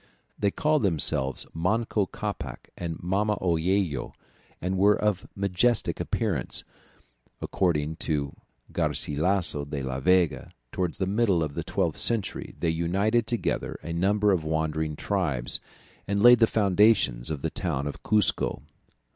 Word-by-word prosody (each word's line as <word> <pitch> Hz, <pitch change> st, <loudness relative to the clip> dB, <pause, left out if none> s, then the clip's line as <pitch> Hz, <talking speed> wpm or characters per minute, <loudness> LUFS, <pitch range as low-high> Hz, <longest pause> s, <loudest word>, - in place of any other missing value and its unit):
They 100 Hz, -, +2 dB
called 150 Hz, +7 st, +1 dB
themselves 70 Hz, -7 st, +1 dB
Manco 105 Hz, +4 st, 0 dB
Capac 90 Hz, -, -6 dB
and 85 Hz, -2 st, -5 dB
Mama 100 Hz, +3 st, 0 dB
Oello, 85 Hz, -4 st, 0 dB, 0.5 s
and 90 Hz, +2 st, -2 dB
were 100 Hz, +2 st, +4 dB
of 105 Hz, -4 st, 0 dB
majestic 100 Hz, +4 st, +1 dB
appearance; 100 Hz, -, -1 dB, 0.8 s
according 80 Hz, -4 st, -1 dB
to 70 Hz, -4 st, -1 dB, 0.4 s
Garcilasso 80 Hz, 0 st, 0 dB
de 70 Hz, -1 st, -5 dB
la 65 Hz, 0 st, -3 dB
Vega, 90 Hz, +2 st, +1 dB, 0.2 s
towards 90 Hz, -3 st, -2 dB
the 95 Hz, -, 0 dB
middle 100 Hz, -4 st, +2 dB
of 75 Hz, -2 st, -4 dB
the -, -, -4 dB
twelfth -, -, -1 dB
century 115 Hz, -5 st, -1 dB
they 85 Hz, -, 0 dB
united 100 Hz, +8 st, +1 dB
together 120 Hz, 0 st, -2 dB
a 85 Hz, +1 st, -5 dB
number 100 Hz, +4 st, +2 dB
of 90 Hz, -5 st, +1 dB
wandering 80 Hz, 0 st, -1 dB
tribes, 75 Hz, -10 st, +1 dB, 0.5 s
and 100 Hz, +1 st, 0 dB
laid 120 Hz, 0 st, +8 dB
the 115 Hz, -, +5 dB
foundations 100 Hz, -, +3 dB
of 75 Hz, -3 st, -4 dB
the -, -, -1 dB
town 65 Hz, +2 st, -2 dB
of 70 Hz, -, -6 dB
Cuzco. 105 Hz, -1 st, +2 dB
90 Hz, 135 wpm, -26 LUFS, 80-105 Hz, 0.8 s, laid